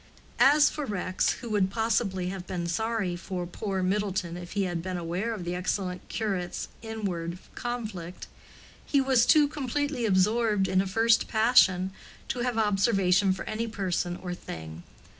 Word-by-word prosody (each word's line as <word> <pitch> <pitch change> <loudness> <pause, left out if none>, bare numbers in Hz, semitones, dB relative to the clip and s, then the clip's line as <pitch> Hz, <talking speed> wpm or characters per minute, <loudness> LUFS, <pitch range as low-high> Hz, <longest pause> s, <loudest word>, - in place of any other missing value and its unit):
As 290 +2 +7
for 300 - -3
Rex, 185 -3 0
who 240 - -6
would 200 -3 +2
possibly 210 -4 0
have 185 -1 -6
been 175 -2 -3
sorry 210 +1 -1
for 180 0 -4
poor 190 +1 -3
Middleton 190 -3 -1
if 175 0 -8
he 200 0 +1
had 175 -3 -2
been 185 +1 -4
aware 175 +6 -2
of 215 -6 -4
the 175 0 -3
excellent 180 0 -3
curate's 195 -6 -3
inward 190 -7 -4 0.2
conflict, 215 -8 -5 0.6
he 280 - +2
was 265 -3 +3
too 300 -2 +6
completely 285 -3 -2
absorbed 210 +1 +2
in 190 0 +3
a 195 - -3
first 225 +4 +3
passion 210 -5 +4 0.4
to 250 - -2
have 240 -1 -1
observation 195 -3 +3
for 185 - -3
any 225 +2 -2
person 185 -5 -2
or 180 -1 -5
thing. 80 - -8
195 Hz, 160 wpm, -28 LUFS, 180-230 Hz, 0.6 s, As